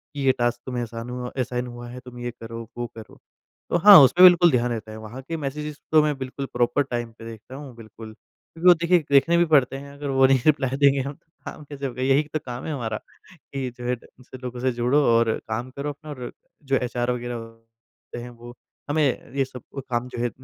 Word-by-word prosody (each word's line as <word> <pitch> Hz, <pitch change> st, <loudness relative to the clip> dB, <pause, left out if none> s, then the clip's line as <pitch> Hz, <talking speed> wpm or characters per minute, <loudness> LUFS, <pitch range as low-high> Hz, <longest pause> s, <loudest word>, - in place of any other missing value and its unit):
ये 135 Hz, -2 st, +3 dB
टास्क 120 Hz, 0 st, 0 dB
तुम्हें 125 Hz, -2 st, -3 dB
असान 115 Hz, +1 st, -7 dB, 0.3 s
असाइन 125 Hz, 0 st, -3 dB
हुआ 120 Hz, 0 st, -9 dB
है 125 Hz, +1 st, -8 dB
तुम 125 Hz, -1 st, -10 dB
ये 120 Hz, 0 st, -4 dB
करो 115 Hz, -1 st, -8 dB, 0.2 s
वो 120 Hz, 0 st, -3 dB
करो। 110 Hz, -1 st, -12 dB, 0.5 s
तो -, -, +2 dB
हाँ 200 Hz, +3 st, +10 dB
उसपे 170 Hz, +7 st, +6 dB
बिल्कुल 175 Hz, -1 st, +8 dB
ध्यान 125 Hz, -2 st, +1 dB
रहता 110 Hz, -1 st, -5 dB
है। 110 Hz, -, -8 dB
वहाँ 110 Hz, +4 st, -9 dB
के 165 Hz, +5 st, -5 dB
मैसेजेज़ 150 Hz, +1 st, -4 dB, 0.2 s
तो 155 Hz, -, +6 dB
मैं 150 Hz, -1 st, 0 dB
बिल्कुल 135 Hz, +1 st, -5 dB
प्रॉपर 120 Hz, +4 st, +2 dB
टाइम 120 Hz, -3 st, -4 dB
पे 115 Hz, -, -10 dB
देखता 115 Hz, +3 st, -10 dB
हूँ 140 Hz, -3 st, -9 dB
बिल्कुल। 110 Hz, -1 st, -11 dB
क्योंकि 165 Hz, +9 st, -6 dB
वो 180 Hz, -, +11 dB
देखिए 170 Hz, +1 st, +3 dB
देखने 165 Hz, +5 st, +5 dB
भी 175 Hz, -, +4 dB
पड़ते 135 Hz, -4 st, +3 dB
हैं 140 Hz, +1 st, -10 dB
अगर 140 Hz, 0 st, -6 dB
वो 135 Hz, 0 st, +4 dB
नहीं 135 Hz, 0 st, +4 dB
रिप्लाई 135 Hz, -3 st, +2 dB
देंगे 140 Hz, -1 st, +4 dB
हम 140 Hz, +2 st, -4 dB
तो 160 Hz, -, -29 dB, 0.2 s
काम -, -, -8 dB
कैसे 140 Hz, -1 st, -7 dB
होगा? 125 Hz, -1 st, -4 dB
यही 135 Hz, +3 st, +3 dB
तो 155 Hz, -, 0 dB
काम 125 Hz, 0 st, -6 dB
है 160 Hz, -, -3 dB
हमारा, 110 Hz, -5 st, -3 dB, 0.4 s
कि 135 Hz, -6 st, -6 dB
जो 125 Hz, -, -8 dB
है 125 Hz, -, +1 dB
उनसे 125 Hz, +2 st, -15 dB
लोगों 125 Hz, -1 st, -7 dB
से 130 Hz, 0 st, +1 dB
जुड़ो 125 Hz, +5 st, +2 dB
और 115 Hz, -1 st, +3 dB, 0.2 s
काम 120 Hz, +3 st, -3 dB
करो 140 Hz, +2 st, -4 dB
अपना 150 Hz, +2 st, -9 dB
और 125 Hz, -4 st, -6 dB, 0.3 s
जो 135 Hz, -1 st, 0 dB
एचआर 125 Hz, -1 st, -1 dB
वग़ैरह 115 Hz, -1 st, -8 dB
हैं 125 Hz, -, -8 dB
वो 120 Hz, 0 st, -12 dB, 0.4 s
हमें 145 Hz, -3 st, 0 dB
ये 135 Hz, -1 st, +2 dB
सब 125 Hz, -2 st, -11 dB, 0.3 s
काम 120 Hz, 0 st, -1 dB
जो -, -, -8 dB
है 120 Hz, -, +1 dB
125 Hz, 225 wpm, -24 LUFS, 120-140 Hz, 0.5 s, वो